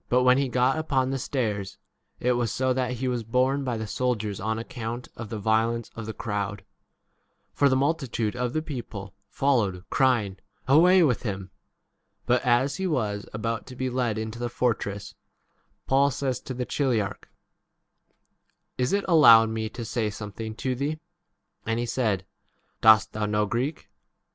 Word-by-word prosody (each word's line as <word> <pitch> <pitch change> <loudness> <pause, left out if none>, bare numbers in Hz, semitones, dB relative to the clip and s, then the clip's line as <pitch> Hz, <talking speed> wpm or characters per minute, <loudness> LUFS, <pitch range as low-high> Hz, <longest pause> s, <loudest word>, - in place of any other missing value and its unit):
But 125 +1 +3
when 125 +1 +5
he 140 -2 0
got 125 +4 +2
upon 135 -4 0
the 135 - -2
stairs 105 -7 -2 0.4
it 125 - +1
was 120 -3 0
so 130 0 +1
that 125 -1 -1
he 130 +1 -3
was 120 -2 -1
borne 130 +5 +1
by 125 -3 -2
the 110 - -4
soldiers 105 -1 -2
on 110 +2 -1
account 115 +1 -6
of 115 -3 -7
the 110 - -4
violence 110 +2 +1
36 - - -12
of 115 - -5
the 110 - -4
crowd. 100 -2 -3 0.9
For 140 - +3
the 130 - +3
multitude 130 -6 0
of 125 0 -2
the 155 - -1
people 110 - -7 0.2
followed, 105 -10 0
crying, 120 -8 +2 0.3
3 135 - +2
7 - - +8
Away 180 +1 +6
with 125 -7 +2
him. 95 -4 -5 0.7
But 125 0 +2
as 130 +2 +2
he 190 0 -1
was 105 - -1
about 115 +1 -3
to 130 - -9
be 130 0 -2
led 120 -4 0
into 110 +1 -5
the 120 0 -2
fortress, 105 -5 -2 0.7
Paul 140 +1 +4
says 130 -2 -2
to 130 - -7
the 125 0 -2
chiliarch, 120 -9 -1 1.5
Is 125 +5 +1
it 200 0 +1
allowed 115 -10 +7
me 110 0 -3
to 115 +1 -7
say 110 -1 -1
something 105 +1 -7
to 130 +3 -2
thee? 145 +5 -2 0.6
And 115 0 -1
he 120 - -1
said, 110 -6 -1 0.6
Dost 110 -1 +6
thou 110 - -5
33 105 -1 -1
know 105 0 +2
Greek 125 +8 -2
120 Hz, 175 wpm, -26 LUFS, 110-130 Hz, 1.5 s, 7